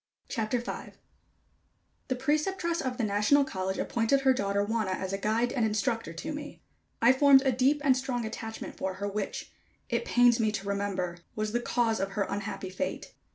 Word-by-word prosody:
CHAPTER 225 +2 -1
V. 240 - -6 1.1
The 255 - 0
Preceptress 330 +6 0
of 255 -2 -3
the 240 - -1
National 210 +7 +3
College 190 -6 -3
appointed 235 +4 +1
her 265 -1 +5
daughter 200 -3 0
Wanna 215 -2 -1
as 190 +1 -3
a - - 0
guide 225 +4 +1
and 245 - +1
instructor 220 +1 0
to 300 - -5
me. 290 0 -7 0.4
I 245 +2 +7
formed 270 0 +6
a 265 - +3
deep 265 +4 +2
and 270 -3 +5
strong 255 -2 -2
attachment 225 0 -6
for 190 0 -3
her, 200 +2 -3
which, 200 0 -4 0.4
it - - 0
pains 245 - +4
me 215 -1 +2
to 200 -2 -4
remember, 195 -3 -2 0.2
was 215 0 -2
the 240 - +1
cause 235 -2 +1
of 195 +1 -2
her 200 - +1
unhappy 200 -2 -4
fate. 280 +9 -4
225 Hz, 185 wpm, -29 LUFS, 200-265 Hz, 1.1 s, I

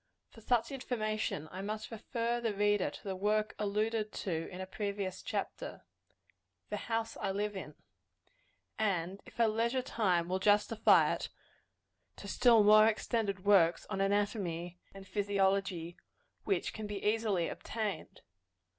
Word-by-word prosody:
For 225 - -15
such 240 +3 +1
information, 215 - -2
I 185 - -6
must 215 +3 -5
refer 235 +1 -2
the 225 -3 -1
reader 205 -1 +2
to - - -12
the 195 -2 -3
work 210 +3 0
alluded 215 +1 0
to 165 -4 -3
in 180 - -9
a 190 - -3
previous 200 -1 -4
chapter - - -4 0.9
"The - - -4
House 225 0 -1
I 195 - -2
Live 205 +1 -2
In" 150 -6 -7 1.0
and, 195 -2 -1
if - - -14
her 230 -1 +4
leisure 235 +4 0
time 180 -9 +1
will 185 +1 -1
justify 210 +3 +4
it, - - -4 0.9
to - - -10
still 230 -4 +5
more 215 +1 +7
extended 215 -3 -1
works 180 -5 +4
on 195 -1 -1
anatomy 195 -4 -1
and 195 0 -12
physiology, 195 -4 0 0.5
which 195 -4 0
can 215 -1 -5
be 205 -1 -5
easily 210 -5 +1
obtained. 215 -6 -5
205 Hz, 140 wpm, -33 LUFS, 190-220 Hz, 1.0 s, more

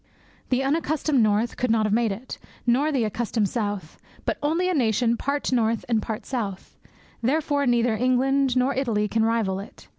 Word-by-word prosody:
The 260 +1 +1
unaccustomed 300 -1 +1
north 215 +2 +1
could 250 - 0
not 220 -1 +3
have 210 - 0
made 230 -1 +2
it, 225 +7 -7 0.3
nor 265 +6 +2
the 265 -5 +1
accustomed 220 -1 -1
south, 205 -8 -4 0.3
but - - -1
only 325 +5 +1
a 370 - +1
nation 235 - +2
part 280 +4 -2
north 230 -2 +1
and 230 -3 +1
part 220 0 -5
south; 205 -7 -4 0.5
therefore 285 +2 +1
neither 240 -2 +2
England 255 +2 +2
nor 255 +2 +2
Italy 230 -6 0
can 220 +2 +1
rival 220 -4 +1
it. 200 - -12
240 Hz, 175 wpm, -24 LUFS, 220-270 Hz, 0.5 s, not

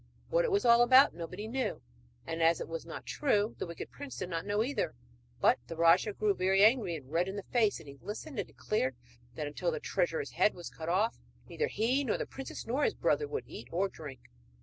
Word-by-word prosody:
What - - +3
it 480 - -1
was 400 -6 +2
all 235 0 +7
about 260 +3 +7
nobody 180 +5 -6
knew, 260 +3 -2 0.5
and, 165 0 -3
as 165 +1 +4
it - - -5
was 165 0 -6
not 165 - -7
true, 215 -7 +1
the - - -3
wicked 170 - -7
prince 285 -2 -8
did 185 -1 -4
not 165 +3 -3
know 205 +1 +2
either; 280 +4 -2 0.4
but - - +4
the 165 - -6
rajah 170 +5 +4
grew 210 0 +1
very 190 +1 +3
angry 215 -6 +4
and 140 -3 -10
red 170 +3 +1
in 190 - -4
the 200 - -5
face 220 -6 +3
as 160 - -13
he 140 -1 -12
listened, 225 +5 -6
and - - -2
declared 130 - -1 0.4
that 150 - -3
until 145 - -2
the 480 -1 -2
treasurer's 485 -1 -1
head 210 - +2
was 175 - -8
cut 160 0 -6
off 205 +6 +1 0.3
neither 460 - -1
he 255 - +1
nor 235 - 0
the - - -3
princess 270 0 -7
nor 260 +6 0
his - - +2
brother 440 - +1
would 440 - -3
eat - - -9
or 185 +4 +1
drink. 145 -7 -10
205 Hz, 230 wpm, -31 LUFS, 170-260 Hz, 0.5 s, all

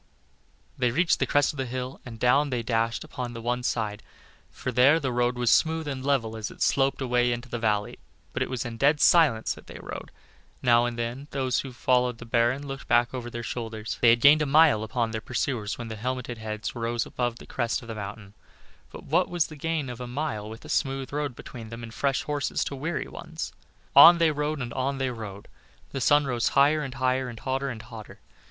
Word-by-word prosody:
They 125 -1 +3
reached 165 +8 +2
the - - +1
crest 145 0 +2
of - - -11
the 130 -1 -2
hill, 130 +2 -5
and 115 -2 -9
down 140 +5 +3
they 125 -3 -2
dashed 115 0 0
upon 125 -1 -6
the 115 -1 -8
other 120 +1 -1
side; 110 -3 -2 0.5
for 125 - -5
there 130 +6 +5
the 135 -5 -2
road 120 0 +1
was 120 -1 +2
smooth 160 -1 +2
and 135 -2 -4
level 130 -6 0
as 110 -1 -4
it - - -3
sloped 135 0 +2
away 125 -1 +2
into 120 +1 -4
the 120 - -3
valley, 105 -2 -1 0.3
but - - -3
it - - 0
was 130 -1 -3
in 115 -1 -6
dead 145 +4 +3
silence 145 -12 +4
that - - -15
they - - -9
rode. - - -7 0.5
Now 120 -1 +5
and 120 -1 -3
then 120 +4 -4
those 130 -2 0
who 135 - -5
followed 125 -1 +1
the 120 - -10
Baron 120 +4 +1
looked 135 -1 -7
back 120 +1 +3
over 120 -2 -5
their 120 0 -6
shoulders. 110 -2 -5
They 120 - +7
had 115 0 +4
gained 145 +3 +7
a 150 - +1
mile 150 -5 +5
upon 115 +1 -1
their 110 -1 -3
pursuers 115 -3 -2
when 120 -1 -6
the 110 - -5
helmeted 125 0 -4
heads 110 0 -4
rose 115 0 -1
above 120 -2 -2
the - - -12
crest 120 -2 -2
of - - -12
the 115 - -5
mountain, 100 -1 -8 0.6
but - - -10
what - - +1
was 175 -2 +1
the 155 - -10
gain 155 -1 -2
of 125 0 -7
a 125 - -5
mile 120 -5 -3
with 110 +1 -10
a - - -10
smooth 135 -1 -1
road 145 -3 -2
between 115 -3 -9
them, 115 +1 -8
and 115 -1 -8
fresh 140 +2 0
horses 145 -2 -1
to 140 - -5
weary 155 +5 -3
ones? - - -7 0.4
On 175 0 +10
they 165 -2 +3
rode 150 -1 -2
and 120 -1 -6
on 135 +1 -1
they 130 -1 -1
rode. 105 -4 -8 0.4
The 135 - -4
sun 145 +4 +4
rose 120 -3 0
higher 150 +3 +5
and 135 -3 -5
higher, 130 0 0
and 115 -2 -9
hotter 135 0 -2
and 115 -3 -7
hotter. 115 -2 -11
125 Hz, 225 wpm, -26 LUFS, 115-140 Hz, 0.6 s, On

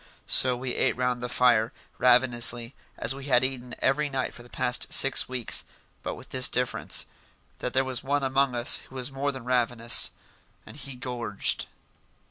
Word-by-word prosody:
So 125 -1 +4
we 125 0 -4
ate - - 0
round 125 -1 -1
the 125 - -4
fire, 120 -2 +3 0.3
ravenously, 120 -1 +3 0.2
as 120 - -1
we 135 0 -9
had 125 -3 +3
eaten 125 -2 -3
every 150 +2 +1
night 135 -2 -3
for - - -12
the 120 - -15
past 125 +1 -1
six 135 -1 +4
weeks, 125 -2 -1 0.4
but - - -4
with - - -13
this 130 -1 +3
difference: 125 0 -1 0.5
that 125 - -4
there 130 0 +2
was 130 -2 -3
one 140 +1 0
among 135 -1 +1
us 120 0 +2
who - - -14
was 130 +1 -3
more 140 +1 -1
than 130 -3 -9
ravenous 120 -2 +3 0.6
and - - -12
he 140 -2 -8
gorged. 120 -5 -2
125 Hz, 175 wpm, -27 LUFS, 120-135 Hz, 0.6 s, So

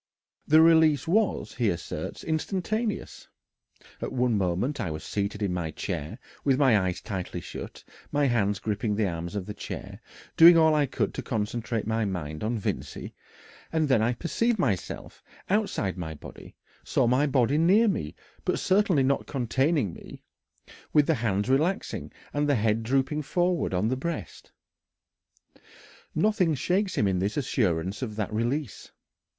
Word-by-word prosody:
The 155 +2 +7
release 160 -4 +5
was, 210 +4 +1
he 120 -4 +1
asserts, 85 -3 -5
instantaneous. 195 +7 -2 0.7
"At - - -3
one 125 -2 +1
moment 100 +9 0
I 90 - -2
was 80 0 -5
seated 100 +1 -3
in 95 -3 0
my 85 -3 -2
chair, 80 -1 -5 0.3
with 135 -2 +3
my 135 -5 +5
eyes 95 -3 0
tightly 95 -4 -4
shut, - - -8 0.3
my 145 0 +2
hands 105 -6 +1
gripping 105 +1 -2
the 105 -1 +1
arms 85 +1 -5
of 100 -3 -3
the 105 - -6
chair, - - -7 0.3
doing 170 +1 +9
all 160 -1 +5
I 150 -2 +2
could - - -1
to - - -4
concentrate 115 0 -2
my 110 +1 0
mind 80 -5 -4
on 115 +2 -1
Vincey, 105 - -4 0.6
and 160 -1 +1
then 130 -5 +3
I 120 +3 +2
perceived 220 - 0
myself 110 - -2 0.3
outside 195 - 0
my 80 -3 -5
body - - -12 0.3
saw - - +1
my 130 +5 +3
body 135 +1 +2
near 195 +8 +5
me, 75 - -2 0.3
but - - 0
certainly 190 -7 +3
not 140 +1 0
containing 130 - 0
me, - - -12 0.7
with 150 -1 +5
the 160 - +3
hands 110 -6 0
relaxing 155 +9 0 0.2
and 145 0 0
the 145 - +4
head 110 0 +1
drooping 135 +5 0
forward 175 +4 0
on 95 +4 +1
the 130 - +1
breast." 170 +6 -5 1.6
Nothing 200 -7 +2
shakes 185 +7 0
him 105 - +3
in 95 -2 0
his 100 +6 -1
assurance 95 - 0
of 110 -5 -4
that 105 0 -3
release. 120 +3 -2
125 Hz, 155 wpm, -27 LUFS, 100-155 Hz, 1.6 s, doing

